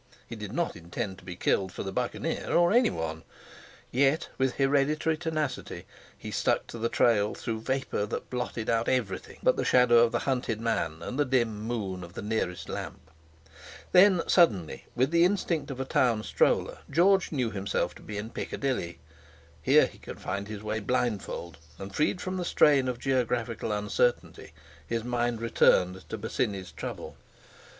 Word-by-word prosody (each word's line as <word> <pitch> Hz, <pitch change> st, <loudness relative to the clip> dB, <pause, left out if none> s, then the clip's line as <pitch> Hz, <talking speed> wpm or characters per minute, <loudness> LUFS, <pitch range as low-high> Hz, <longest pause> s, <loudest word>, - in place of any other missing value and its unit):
He 115 Hz, -, -7 dB
did 105 Hz, -2 st, -7 dB
not 170 Hz, +7 st, -1 dB
intend 95 Hz, +4 st, -5 dB
to -, -, -18 dB
be 90 Hz, -, -7 dB
killed 95 Hz, +1 st, 0 dB
for -, -, -5 dB
the 95 Hz, -, -4 dB
Buccaneer, -, -, -2 dB
or 175 Hz, +2 st, +4 dB
anyone. 80 Hz, -, +1 dB, 0.7 s
Yet, 140 Hz, +5 st, +2 dB
with 130 Hz, -1 st, +1 dB
hereditary 145 Hz, +3 st, +2 dB
tenacity, 155 Hz, -4 st, -3 dB, 0.3 s
he -, -, -8 dB
stuck -, -, +1 dB
to 115 Hz, -, -7 dB
the 115 Hz, +1 st, 0 dB
trail 105 Hz, -3 st, +2 dB
through 110 Hz, -1 st, -4 dB
vapour 130 Hz, -4 st, -1 dB
that -, -, -5 dB
blotted 125 Hz, -2 st, -3 dB
out 115 Hz, 0 st, +1 dB
everything 110 Hz, -8 st, -2 dB
but -, -, +3 dB
the -, -, 0 dB
shadow 125 Hz, -2 st, +5 dB
of 115 Hz, 0 st, +4 dB
the -, -, +1 dB
hunted 125 Hz, -5 st, -1 dB
man 100 Hz, -9 st, -2 dB
and 130 Hz, -, -4 dB
the -, -, +5 dB
dim 120 Hz, -4 st, +1 dB
moon 105 Hz, -5 st, -3 dB
of 85 Hz, 0 st, -11 dB
the -, -, -6 dB
nearest 90 Hz, -6 st, -2 dB
lamp. 85 Hz, -2 st, -7 dB, 0.8 s
Then 185 Hz, -1 st, +6 dB
suddenly, 95 Hz, -, +2 dB
with 130 Hz, +4 st, +2 dB
the 170 Hz, 0 st, +5 dB
instinct 175 Hz, -4 st, 0 dB
of 135 Hz, -2 st, -6 dB
a 135 Hz, -, -2 dB
town 120 Hz, -4 st, +2 dB
stroller, -, -, +1 dB
George 185 Hz, +5 st, +3 dB
knew 125 Hz, -7 st, -1 dB
himself 100 Hz, -1 st, -1 dB
to -, -, -15 dB
be 105 Hz, -, -7 dB
in 110 Hz, +3 st, -5 dB
Piccadilly. 125 Hz, -16 st, -3 dB, 0.6 s
Here -, -, +5 dB
he -, -, -11 dB
could -, -, -9 dB
find 100 Hz, +1 st, -4 dB
his 105 Hz, -1 st, -7 dB
way 110 Hz, +1 st, -2 dB
blindfold; 105 Hz, -8 st, -2 dB, 0.2 s
and 95 Hz, 0 st, -8 dB
freed 155 Hz, -, +1 dB
from 185 Hz, 0 st, -3 dB
the 180 Hz, -, -2 dB
strain 140 Hz, -5 st, +4 dB
of 125 Hz, -1 st, -2 dB
geographical 120 Hz, -4 st, -1 dB
uncertainty, 105 Hz, +4 st, -1 dB, 0.4 s
his 115 Hz, -1 st, -2 dB
mind 120 Hz, -1 st, -1 dB
returned 95 Hz, -5 st, +2 dB
to 110 Hz, -, -4 dB
Bosinney's 100 Hz, -4 st, -2 dB
trouble. -, -, -7 dB
115 Hz, 170 wpm, -28 LUFS, 100-135 Hz, 0.8 s, Then